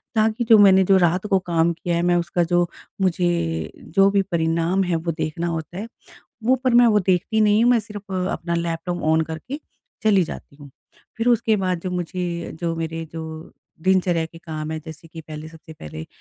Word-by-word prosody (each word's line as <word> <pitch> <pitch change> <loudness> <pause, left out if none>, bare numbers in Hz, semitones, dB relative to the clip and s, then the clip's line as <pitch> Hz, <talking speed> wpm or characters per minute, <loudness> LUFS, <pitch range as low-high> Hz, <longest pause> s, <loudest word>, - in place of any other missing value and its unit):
ताकि 220 +2 +2
जो 225 - +9
मैंने 190 -2 +7
जो 190 +1 +4
रात 180 +2 +2
को 195 -2 +3
काम 165 0 +3
किया 170 +1 -3
है 170 - +1
मैं 175 0 +3
उसका 175 0 0
जो 175 +1 +2 0.3
मुझे, 170 - 0
जो 195 +4 +2
भी 200 0 +3
परिणाम 165 +3 +1
है 175 -2 0
वो 165 +1 -2
देखना 160 +1 -3
होता 165 +1 -4
है। 210 +4 -5 0.6
वो 255 +3 +4
पर 255 -2 +3
मैं 240 0 +7
वो 215 -2 +4
देखती 190 +4 +1
नहीं 210 +1 +4
हूँ 245 - +5
मैं 240 -2 +4
सिर्फ़ 205 -1 -10 0.2
अपना 170 0 -3
लैपटॉप 170 +1 -3
ऑन 160 +1 +3
करके 245 - -6 0.4
चली 210 -4 +4
जाती 145 - -9
हूँ। 145 -1 -13 0.5
फिर 230 +2 0
उसके 230 -2 +3
बाद 185 -3 -1
जो 185 - -4
मुझे 175 -1 -3
जो 170 -1 -1
मेरी 165 0 -4
जो 165 0 -5 0.6
दिनचर्या 180 -2 +2
के 165 +1 -14
काम 155 -2 -6
हैं 160 0 -4
जैसे 160 0 -11
कि 160 0 -9
पहले 155 0 -8
सबसे 160 0 -13
पहले 80 - -9
175 Hz, 200 wpm, -22 LUFS, 165-195 Hz, 0.6 s, जो